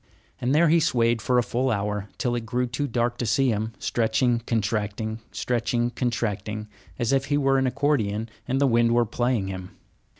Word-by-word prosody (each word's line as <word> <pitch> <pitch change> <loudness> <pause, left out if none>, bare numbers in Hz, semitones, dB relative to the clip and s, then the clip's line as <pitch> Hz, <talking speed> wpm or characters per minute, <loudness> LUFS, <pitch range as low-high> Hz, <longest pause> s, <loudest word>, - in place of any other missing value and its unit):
And 130 +4 +1
there 170 +2 +5
he 165 +2 +5
swayed 120 -7 +2
for 125 +3 +1
a 120 - +4
full 125 +3 0
hour, 105 -2 -2
till 120 - 0
it 120 -1 -2
grew 125 +2 -1
too 135 +4 -2
dark 120 0 -1
to 120 - -1
see 130 +6 +3
him, 110 0 -1
stretching, 120 +1 +1
contracting, 110 0 -1
stretching, 120 0 -1
contracting, 110 -3 -2 0.3
as 120 +2 0
if 135 0 +2
he 145 +1 +1
were 135 -1 +3
an 130 - +1
accordion 120 -5 0 0.2
and 130 +2 0
the 140 - +4
wind 120 -2 +3
were 120 0 +4
playing 120 -2 0
him. 95 -1 -7
120 Hz, 190 wpm, -25 LUFS, 110-130 Hz, 0.3 s, there